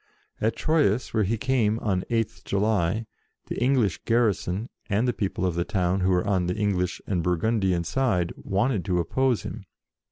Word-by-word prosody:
At 110 +1 +1
Troyes, 140 -8 +1
where 110 -3 +2
he 115 +4 0
came 115 -3 +1
on 100 -5 0
8th 115 -2 -1
July, 105 0 0 0.4
the - - -3
English 125 - +2
garrison, 110 -3 +1 0.2
and 110 +4 +1
the 125 - +1
people 95 -3 -2
of 90 - +1
the 85 +1 0
town 90 +1 0
who 95 0 +1
were 90 0 +2
on 95 -3 +1
the 90 - -1
English 95 -4 0
and 90 -4 0
Bur 90 +1 +1
gundian 95 -4 +1
side, 90 -6 0
wanted 100 0 0
to 90 -2 +1
oppose 125 +8 +1
him. - - -6
100 Hz, 180 wpm, -26 LUFS, 90-115 Hz, 0.4 s, where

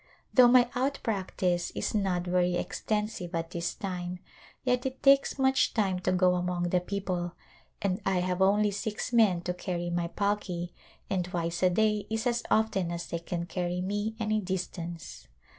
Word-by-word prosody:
Though 250 -2 +8
my 245 0 +6
out 270 +3 0
practice 185 -4 -1
is - - -2
not 190 -4 +1
very 180 0 +2
extensive 210 -2 -2
at 165 0 -3
this 170 0 -3
time 180 -2 -4 0.5
yet 250 -1 +1
it 265 0 -5
takes 275 0 +5
much 265 0 +2
time 195 -5 +1
to 185 0 0
go 185 0 +4
among 180 -1 -1
the 180 - +3
people 180 -2 -3 0.5
and 190 -1 0
I 190 -2 +1
have 180 +1 -1
only 205 +2 +4
six 210 +4 -3
men 210 -7 +4
to 180 +1 -2
carry 175 -1 -3
my 170 0 0
palki 185 -3 -2 0.3
and 185 -2 0
twice 170 -1 -3
a 185 - +5
day 210 +2 +1
is 220 +1 -2
as 240 -1 +1
often 195 -5 +2
as 170 0 -4
they 170 - -4
can 170 0 -4
carry 180 -1 -2
me 205 +4 -2
any 215 -1 +1
distance. 175 - -5
185 Hz, 175 wpm, -29 LUFS, 175-215 Hz, 0.5 s, Though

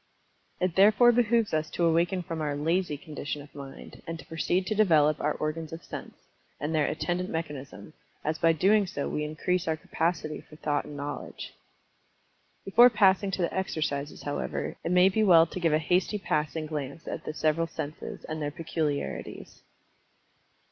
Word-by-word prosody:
It 180 -2 0
therefore 215 +5 +6
behooves 235 -3 +2
us 155 0 0
to 170 - 0
awaken 170 +2 +2
from 165 -1 -5
our 145 -2 -1
"lazy" 160 +1 0
condition 150 0 -5
of 145 - -17
mind, 140 -1 -10
and 165 0 -4
to 140 - -12
proceed 175 +3 0
to 195 - -1
develop 155 -8 +4
our 150 - +1
organs 155 +1 -3
of 165 +1 -8
sense, - - -8 0.4
and 150 +2 -2
their 155 -2 +2
attendant 175 +4 -2
mechanism, 150 -2 -6 0.3
as 155 +1 -1
by 165 - +5
doing 195 +5 +3
so 145 -5 -3
we 150 - -2
increase 165 +4 -1
our 160 -1 0
capacity 160 -1 -2
for 155 - -16
thought 150 -1 -1
and 145 - -8
knowledge. 145 +1 -6 1.1
Before 240 +6 +7
passing 200 -3 +3
to 185 -1 -1
the 170 - -1
exercises, 150 -6 -2
however, 145 - -3
it - - -2
may 180 +1 +6
be 195 +3 +1
well 170 -6 +7
to 175 - -6
give 165 -2 +2
a 155 - +4
hasty 180 +6 +1
passing 155 -4 -1
glance 150 0 -5
at - - -5
the - - -4
several 160 +2 +1
senses, 155 -2 -6
and 155 0 -5
their 145 - -1
peculiarities. 150 -1 -4
160 Hz, 175 wpm, -28 LUFS, 150-180 Hz, 1.1 s, Before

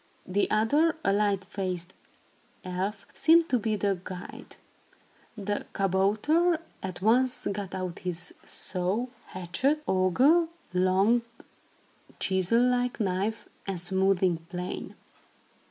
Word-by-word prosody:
The 195 +2 +1
other, 290 +10 +3
a 195 - +4
light 200 -2 +1
faced 185 -2 -4 0.7
elf, 190 +3 -3
seemed 330 +1 +5
to 250 - +2
be 215 0 0
the 200 -2 0
guide. 180 -1 -9 0.8
The 205 0 -3
kabouter 215 - +2 0.2
at 185 -1 -6
once 250 +4 +3
got 195 -2 -4
out 185 -2 -4
his 180 0 -5
saw, 190 +6 -2 0.2
hatchet, 220 - -1
auger, 260 - +4 0.3
long, 190 +6 +3 1.0
chisel 190 +5 +2
like 250 0 0
knife, 200 +2 -1 0.2
and 190 -3 -2
smoothing 190 0 +2
plane. 180 0 -5
195 Hz, 105 wpm, -28 LUFS, 185-235 Hz, 1.0 s, seemed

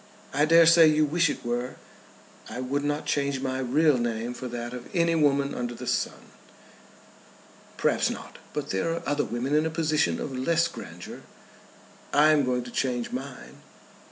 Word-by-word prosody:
"I 145 +2 +3
dare 165 +1 +6
say 165 0 +7
you 155 0 +3
wish 165 +2 +2
it - - -5
were." 120 +1 -2 0.7
"I - - -6
would 135 +3 -2
not 145 +1 -2
change 140 -2 0
my 130 0 -2
real 135 +2 +3
name 120 0 -2
for 130 +1 -6
that 120 0 -5
of 125 -1 -8
any 170 -1 +3
woman 140 -3 +2
under 120 -1 -4
the - - -8
sun." - - -2 1.5
"Perhaps - - +2
not; - - -8
but - - -4
there 95 +12 0
are - - -6
other 145 0 0
women 125 +4 -3
in 155 +1 +3
a - - -1
position 155 - 0
of 135 - -5
less 170 +6 +2
grandeur. - - -9 0.9
I 150 +2 +6
am 145 -3 +3
going 125 -1 0
to 120 - -10
change 125 -2 -1
mine." 130 0 -8
140 Hz, 175 wpm, -26 LUFS, 125-155 Hz, 1.5 s, say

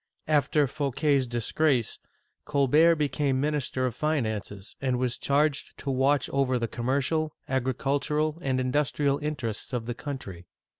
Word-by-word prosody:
After 150 -1 +3
Fouquet*s 140 0 0
disgrace, 120 +2 0 0.4
Colbert 150 +4 +4
became 145 -3 0
minister 140 -3 0
of 125 - -1
finances 110 -8 -2
and 130 -2 +1
was 125 -1 -1
charged 145 +1 0
to 140 - -3
watch 135 +2 +2
over 135 -2 +1
the 115 -1 -1
commer 130 +5 0
cial, 155 +2 0 0.2
agricultural, 140 +4 0
and 130 -3 0
industrial 140 +2 +1
interests 135 -6 -4
of 120 -2 -2
the 120 - -3
country. 115 - -7
135 Hz, 135 wpm, -27 LUFS, 125-150 Hz, 0.4 s, Colbert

